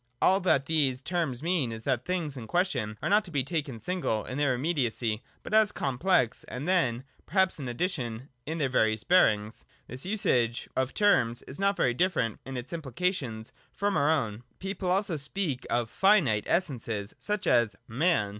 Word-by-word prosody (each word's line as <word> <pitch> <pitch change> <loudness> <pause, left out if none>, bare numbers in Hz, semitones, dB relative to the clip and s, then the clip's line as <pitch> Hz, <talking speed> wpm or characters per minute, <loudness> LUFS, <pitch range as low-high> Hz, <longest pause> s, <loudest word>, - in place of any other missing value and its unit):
All 190 +1 +4
that 155 -8 +2
these 140 -5 +2
terms 150 -3 -2
mean 165 -8 +1
is 110 0 -7
that 130 -2 0
the 180 - -4
things 165 -6 -2
in 120 -4 -7
question 125 - 0
are - - 0
not 210 +2 +4
to - - -7
be 145 -5 0
taken 140 -5 -3
single, 175 - -1
in 130 +2 -5
their 140 -3 +2
immediacy, 120 -6 -1 0.2
but - - -7
as 215 -1 +6
a - - -9
complex, 135 -2 +1
and 135 +6 -6
then, 130 -10 +1 0.2
perhaps, 190 0 +2
in 135 - -5
addition, 120 - -3 0.2
in 160 +2 -2
their 145 -4 +1
various 110 -4 +1
bearings. 110 - +3 0.2
This 130 +2 -7
usage 125 - 0
of 130 0 +1
the - - -17
term 160 - +3
is 135 - -7
not 200 0 +2
very 120 - +2
different 125 - 0
in 135 -1 -5
its 125 +4 -7
implication 145 - -2 0.3
from 200 0 -1
our 145 0 +3
own. 115 -9 0 0.2
People 190 -1 -3
also 185 -2 +1
speak 145 -2 -3
oi 120 0 +2
Jinite 145 - +3
Essences, 115 - -1
such 210 -1 -2
as 120 -3 +3
man. 125 - +1
140 Hz, 185 wpm, -28 LUFS, 120-180 Hz, 0.3 s, as